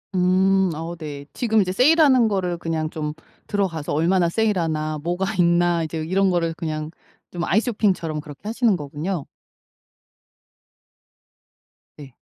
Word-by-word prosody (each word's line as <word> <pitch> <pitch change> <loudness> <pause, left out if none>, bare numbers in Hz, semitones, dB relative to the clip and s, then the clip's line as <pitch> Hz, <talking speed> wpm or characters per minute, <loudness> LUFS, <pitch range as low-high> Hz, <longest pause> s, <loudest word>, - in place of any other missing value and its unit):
음 185 0 +3
어 165 +2 -5
네. 145 -3 -7
지금 220 -3 +2
이제 185 -1 -1
세일하는 260 - +5
거를 180 -4 -1
그냥 160 -2 -2
좀 150 -2 -4 0.3
들어가서 185 -7 -2
'얼마나 170 +3 +2
세일하나? 165 -7 0
뭐가 175 +3 -1
있나?' 175 -1 +3
이제 160 0 -4
이런 190 +4 +2
거를 165 -2 0
그냥 155 -2 -4 0.4
좀 175 -1 -4
아이쇼핑처럼 195 -6 0
그렇게 145 -1 -11
하시는 230 -2 +2
거군요. 150 +2 -4 2.7
네. 135 -4 -12
175 Hz, 275 characters per minute, -22 LUFS, 155-195 Hz, 2.7 s, 세일하는